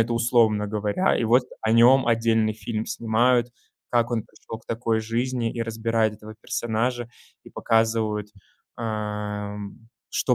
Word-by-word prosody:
это 115 +1 +1
условно 115 -3 +3
говоря. 105 - 0
И 115 - 0
вот 120 +3 +4 0.2
о 110 0 +1
нём 120 +2 +6
отдельный 115 -2 +2
фильм 110 0 -4
снимают, 120 +3 +2 0.4
как 120 0 +2
он 115 -3 0
пришел 110 - -10
к - - -25
такой 115 -1 0
жизни 115 +1 -1
и 115 - -5
разбирают 115 -1 0
этого 110 0 -11
персонажа, 120 +1 -2 0.3
и - - -14
показывают, 110 -2 0 0.5
ам, 105 -2 -4 0.3
что - - +1
115 Hz, 140 wpm, -24 LUFS, 110-120 Hz, 0.5 s, нём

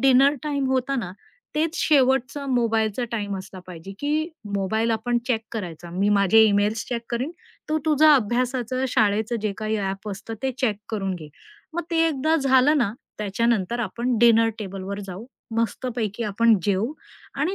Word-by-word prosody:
Dinner 270 +2 +5
time 285 -2 -1
होतं 265 +1 0
ना, 190 -6 -4 0.4
तेच 315 +2 0
शेवटचा 270 -1 +2
मोबाईलचा 230 -2 +1
टाईम 205 -3 -2
असला 190 0 -9
पाहिजे 180 +2 -9
की 305 +3 0 0.3
मोबाईल 220 +4 0
आपण 240 +2 0
चेक 225 -3 +2
करायचा. 175 -5 -6
मी 195 +4 0
माझे 205 +1 +5
ईमेल्स 210 +1 +2
चेक 235 -2 -2
करीन, 250 +6 -1 0.4
तू 310 0 +1
तुझं 310 0 +5
अभ्यासाचं, 255 0 +2
शाळेचं 220 0 +1
जे 210 -2 0
काही 215 0 -1
ॲप 195 +1 -3
असतं 210 +3 -6
ते 265 - +1
चेक 220 -6 +1
करून 195 -3 -2
घे. 155 -4 -9 0.4
मग 345 - -2
ते 335 - 0
एकदा 310 +2 +1
झालं 275 +1 +4
ना, 215 -5 +1 0.3
त्याच्यानंतर 220 +1 0
आपण 235 +3 -1
डिनर 230 -1 +5
टेबलवर 195 0 -5
जाऊ, 190 +4 -7 0.3
मस्तपैकी 230 -1 -2
आपण 220 +2 +3
जेवू 205 +7 0 0.4
आणि 305 +8 -1
230 Hz, 155 wpm, -24 LUFS, 205-260 Hz, 0.4 s, डिनर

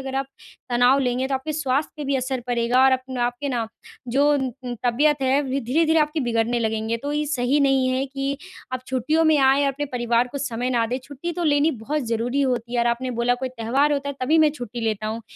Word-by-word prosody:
अगर 265 0 -6
आप 270 0 -1 0.4
तनाव 245 +3 +4
लेंगे, 255 -1 0
तो 275 - 0
आपके 265 +4 -3
स्वास्थ्य 290 -1 -1
पे 300 - -5
भी 275 0 0
असर 260 0 -2
पड़ेगा 245 +1 +2
और 265 - +5
अपना 260 -1 -1
आपके 245 +4 -4
ना, 240 -4 -1 0.4
जो 275 +4 +3
न 265 -3 -2
उम, 245 -1 -3
तबीयत 285 +4 +2
है, 265 +2 +2 0.2
धीरे-धीरे 320 +7 +2
आपकी 300 +1 0
बिगड़ने 235 -1 0
लगेंगे। 220 0 -1
तो 285 +5 -4
ये 300 0 0
सही 275 0 +1
नहीं 270 -2 +3
है 260 +1 0
कि 275 +1 -3 0.4
आप 255 - -2
छुट्टियों 265 +6 +1
में 315 -1 +5
आएँ, 270 +1 +4
अपने 275 +1 -1
परिवार 240 0 +1
को 285 - -3
समय 250 -2 -2
ना 235 -2 +2
दें। 250 +3 -2
छुट्टी 290 +5 -6
तो 350 0 -3
लेनी 295 0 +3
बहुत 300 +4 -1
ज़रूरी 235 +4 0
होती 245 -3 -1
है 240 - +2
और 235 - +1
आपने 240 +2 -1
बोला 245 +1 +3
कोई - - -1
त्योहार 255 +4 +1
होता 280 -1 -1
है, 280 - -4
तभी 300 +6 +3
मैं 310 -1 +5
छुट्टी 245 -5 -7
लेता 215 -2 -1
हूँ। 225 +2 -4
260 Hz, 230 wpm, -23 LUFS, 240-285 Hz, 0.4 s, और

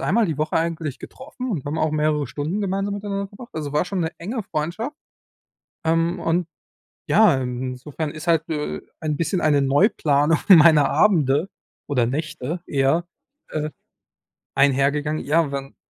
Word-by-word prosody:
einmal 200 +11 +2
die 160 -5 -2
Woche 155 - 0
eigentlich 165 -4 -2
getroffen 260 -1 -8
und 175 - -3
haben 150 +3 -3
auch 155 -1 +1
mehrere 150 -1 +1
Stunden 150 - -3
gemeinsam 195 0 -1
miteinander 200 -1 -4
verbracht. 235 +5 -12
Also 150 -3 -5
war 150 - +2
schon 185 0 -3
'ne 160 -1 -1
enge 220 +7 -4
Freundschaft, 195 - -4 0.9
ähm, 165 +2 +1
und 170 +1 0 0.6
ja, - - +5
insofern 130 +4 -4
ist 155 +3 -9
halt, 165 -1 +2
äh, 150 -2 -3 0.2
ein 155 -2 -2
bisschen 175 +4 -1
eine 145 -2 +3
Neuplanung 145 - +3
meiner 160 -5 +7
Abende 155 -5 +3 0.4
oder 130 -5 +1
Nächte 155 +4 -4
eher, 140 +5 +1 0.4
äh, 155 0 -2 0.8
einhergegangen. 145 +2 +2
Ja, 150 0 +1
wenn 135 0 -5
155 Hz, 145 wpm, -22 LUFS, 145-180 Hz, 0.9 s, meiner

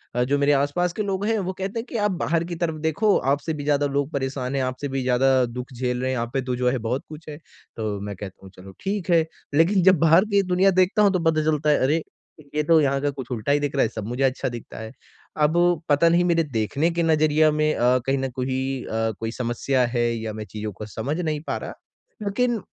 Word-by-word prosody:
अ, 125 - +2
जो 140 +3 +1
मेरे 145 +1 +3
आस-पास 145 +6 +1
के 215 - -3
लोग 195 0 -2
हैं, 225 0 +1
वो 185 0 -3
कहते 195 +4 -4
हैं 225 - -5
कि 235 - -3
आप 210 -1 +1
बाहर 165 -1 0
की 170 0 -5
तरफ 165 -1 -2
देखो 165 +7 +2 0.2
आपसे 150 +3 -1
भी 145 - -5
ज़्यादा 145 0 +2
लोग 140 +2 -1
परेशान 135 -1 -3
हैं 135 - +1
आपसे 130 +3 -3
भी 135 -1 -2
ज़्यादा 130 0 +3
दुःख 125 +2 -7
झेल 125 0 -2
रहे 130 - -1
हैं, 130 - -1
यहाँ 115 -1 -2
पे 135 - 0
तो 125 -1 -2
जो 125 0 +1
है 130 - 0
बहुत 120 +4 -2
कुछ 155 0 -10
है। 145 - -7 0.4
तो 105 -2 -3
मैं 100 -1 -5
कहता 95 0 -9
हूँ 95 - -11
चलो 95 +1 -12
ठीक 195 -2 -3
है 165 -2 +4 0.3
लेकिन 175 +5 +4
जब 185 -4 +5
बाहर 165 +4 +5
की 200 - +4
दुनिया 185 +2 +3
देखता 200 +4 +2
हूँ 200 -2 +5
तो 185 - +1
पता 155 -1 0
चलता 150 -1 +1
है 150 - +4
अरे! 155 +4 +1 0.5
ये 150 - +2
तो 160 +1 +5
यहाँ 140 -1 +1
का 145 - +1
कुछ 130 -2 -8
उल्टा 120 +3 -1
ही 145 - +3
दिख 145 -1 -2
रहा 135 - +3
है, 110 - +1
सब 110 -2 -6
मुझे 125 +3 -2
अच्छा 130 -1 0
दिखता 120 -2 -9
है। 110 0 -7 0.5
अब 170 +2 +2
पता 145 +4 +4
नहीं 175 +1 +3
मेरे 170 -2 +2
देखने 140 +5 -1
के 170 0 -1
नज़रिया 155 -1 +3
में 155 0 +1
अ, 125 +1 +3
कहीं 135 0 +1
न 135 0 -2
कोई 130 0 -2
अ, 115 0 -1
कोई 115 0 -3
समस्या 125 +2 0
है 120 -1 0
या 110 -1 -5
मैं 110 0 -6
चीज़ों 105 0 -5
को 105 - -8
समझ 110 - -4
नहीं 155 -4 -2
पा - - -1
रहा? - - -7 0.5
लेकिन 230 +2 0
145 Hz, 255 wpm, -23 LUFS, 125-165 Hz, 0.5 s, जब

